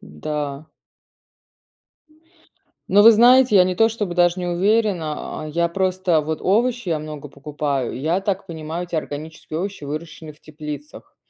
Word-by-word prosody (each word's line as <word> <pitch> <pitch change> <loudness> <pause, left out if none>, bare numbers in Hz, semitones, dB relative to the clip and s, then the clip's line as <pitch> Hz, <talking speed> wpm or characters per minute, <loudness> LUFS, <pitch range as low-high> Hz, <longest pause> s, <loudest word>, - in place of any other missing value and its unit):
да. 145 - -5 2.2
Но 205 +2 +6
вы 230 +2 +9
знаете, 245 0 +6
я 185 - +7
не 185 0 -1
то 225 +2 +4
чтобы 210 -6 -4
даже 175 0 +3
не 180 - -3
уверена, 180 -5 0
а 155 - -6
я 170 +2 0
просто 185 -2 +1
вот 155 +1 -4
овощи 235 +3 +1
я 160 -2 0
много 150 -1 -8
покупаю, 140 -2 -3
и 125 - -6
я 165 +7 0
так 195 0 -2
понимаю, 160 +1 -5
эти 170 - -8
органические 155 +1 -6
овощи 195 -6 -5
выращены 155 +1 -7
в 150 - -26
теплицах. 150 -1 -9
170 Hz, 155 wpm, -21 LUFS, 150-195 Hz, 2.2 s, вы